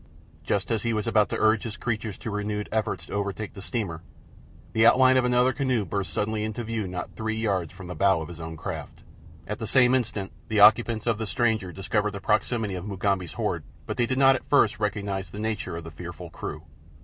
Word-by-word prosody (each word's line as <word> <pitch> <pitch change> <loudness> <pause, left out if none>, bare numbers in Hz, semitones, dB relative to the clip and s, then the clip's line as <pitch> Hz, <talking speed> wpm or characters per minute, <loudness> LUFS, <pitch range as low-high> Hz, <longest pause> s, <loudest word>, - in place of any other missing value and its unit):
Just 100 +6 -1
as 110 -2 +1
he 115 -1 0
was 105 -1 -1
about 110 -2 +3
to - - -2
urge 110 0 +3
his 115 -1 -5
creatures 110 -4 -3
to 110 - -5
renewed 105 0 -2
efforts 110 -1 -1
to - - -9
overtake 100 +1 -3
the 100 - -9
steamer 95 -7 -3 0.7
the 110 - +3
outline 130 +2 +6
of 130 -1 +4
another 125 +1 +3
canoe 130 -6 0
burst 100 +2 -3
suddenly 105 0 -1
into 110 +2 -3
view 110 -3 -2
not 90 0 -6
three 110 -1 -2
yards 100 -6 -1
from 95 0 -11
the 90 - -5
bow 95 -2 +3
of 80 - -5
his 85 0 -10
own 80 0 -6
craft. - - -6 0.4
At 105 - -5
the 110 - -4
same 125 +2 +5
instant 110 -6 -1 0.2
the 110 -2 +1
occupants 110 +1 +6
of 115 -2 +1
the 110 - -2
stranger 110 -5 +1
discovered 105 +3 -1
the 100 - -5
proximity 105 +1 0
of 90 +2 -5
Mugambi's 95 -3 -1
horde, - - -2 0.2
but - - -3
they 120 -1 +2
did 130 - -1
not 135 0 +6
at - - -7
first - - +4
recognize 100 -3 -2
the 100 - -10
nature 110 -5 -2
of 85 - -6
the 80 - -8
fearful 85 +2 -8
crew. 75 -1 -6
105 Hz, 220 wpm, -26 LUFS, 95-115 Hz, 0.7 s, outline